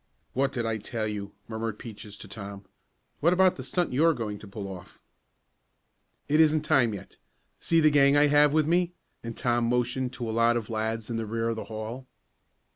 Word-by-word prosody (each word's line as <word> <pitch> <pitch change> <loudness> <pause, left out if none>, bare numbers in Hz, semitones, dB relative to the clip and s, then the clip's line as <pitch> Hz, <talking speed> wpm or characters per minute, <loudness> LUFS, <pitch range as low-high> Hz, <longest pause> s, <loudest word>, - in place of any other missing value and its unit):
"What 135 +1 +1
did 120 -4 -2
I 115 -1 0
tell 110 +1 -3
you?" 100 -1 -5
murmured 110 -1 -4
Peaches 105 -2 -9
to - - -10
Tom. 100 0 -8 0.5
"What 170 +3 +4
about 185 0 +4
the - - -7
stunt 170 +4 -1
you 135 - +1
were 165 -1 +5
going 105 -4 -4
to 105 - -11
pull 100 0 -6
off?" 90 -2 -10 1.3
"It 150 +2 +2
isn't 155 -1 +5
time 120 -7 +2
yet. 95 - -11 0.4
See 165 - +2
the 155 -1 +5
gang 140 0 +5
I 145 - +6
have 145 0 +5
with 155 0 +3
me?" 175 +2 +1 0.3
and 115 -1 -6
Tom 120 -1 +1
motioned 125 +1 0
to 120 -2 -4
a - - -2
lot 115 +1 +3
of 115 -1 -5
lads 110 +1 -2
in 115 - -1
the 110 -1 -3
rear 115 +1 -1
of 115 - -1
the 110 - -6
hall. 115 +4 -6
115 Hz, 205 wpm, -27 LUFS, 110-145 Hz, 1.3 s, I